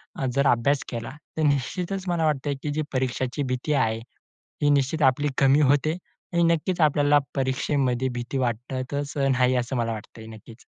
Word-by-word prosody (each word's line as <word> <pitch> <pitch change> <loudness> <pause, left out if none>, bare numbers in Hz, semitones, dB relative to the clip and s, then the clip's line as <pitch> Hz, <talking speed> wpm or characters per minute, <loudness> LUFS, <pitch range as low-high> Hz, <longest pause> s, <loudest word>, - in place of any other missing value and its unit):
अ, 135 - -3
जर 140 0 +3
अभ्यास 135 +4 +1
केला, 115 +1 -5 0.3
तर - - 0
निश्चितचं 160 +7 0
मला 165 -2 +1
वाटतं 145 -1 0
की 150 - -2
जी 155 +1 -1
परीक्षेची 130 +2 -1
भीती 140 +4 -1
आहे. 110 -4 +1 0.6
ही 145 - +4
निश्चित 145 +2 +1
आपली 135 +3 +3
कमी 140 +2 +5
होते 145 +3 +2 0.4
आणि 170 0 +3
नक्कीचं 170 +1 +2
आपल्याला 145 -1 +4 0.2
परीक्षेमध्ये 130 -1 0
भीती 120 +2 -4
वाटतचं 130 +3 -2
नाही, 130 0 +3
असं 125 +1 -1
मला 115 -1 0
वाटत 110 +1 -10
हे, 110 - -9
नक्कीचं. 110 +1 -13
135 Hz, 165 wpm, -25 LUFS, 125-145 Hz, 0.6 s, कमी